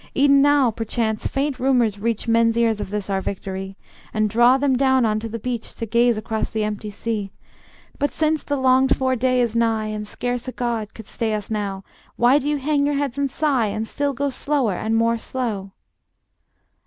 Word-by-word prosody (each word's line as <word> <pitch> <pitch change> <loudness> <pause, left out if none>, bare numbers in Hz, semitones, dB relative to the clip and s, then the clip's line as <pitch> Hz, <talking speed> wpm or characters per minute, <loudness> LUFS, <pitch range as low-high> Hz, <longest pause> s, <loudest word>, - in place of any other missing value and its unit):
E'en 280 0 +5
now 285 -4 +4
perchance 220 0 -2
faint 275 -1 -2
rumors 245 -6 +2
reach 230 +1 -2
Men's 230 0 +3
ears 225 -3 +2
of - - -5
this 210 -1 -3
our 195 -1 -1
victory, 195 0 -5 0.4
And 215 -1 +1
draw 240 +4 +5
them 270 -1 +2
down 260 -1 +3
unto 215 +1 -1
the 230 - -4
beach 235 0 -5
To 230 - -4
gaze 235 +1 +2
across 220 0 -2
the 220 -1 -2
empty 210 0 -3
sea. 205 -1 -3 0.7
But 285 0 +1
since 310 -1 0
the 285 - -2
longed 260 0 +3
for 260 -1 +1
day 255 +1 +1
is 235 -2 -1
nigh, 225 -2 +1
And 210 0 -5
scarce 245 +2 -3
a 255 - -4
god 230 -3 -3
could 225 - -10
stay 220 0 -2
us 210 +1 -6
now, 200 -3 -3 0.3
Why 250 +4 +4
do 290 - -2
ye 295 - +1
hang 285 +1 +1
your 290 - 0
heads 280 -1 -2
and 280 -1 +1
sigh, 270 -4 +1
And 215 +2 -3
still 285 +2 -1
go 280 +2 -1
slower 265 -5 0
and 220 +5 -1
more 230 0 +2
slow? 220 -7 -3
235 Hz, 200 wpm, -22 LUFS, 215-265 Hz, 0.7 s, E'en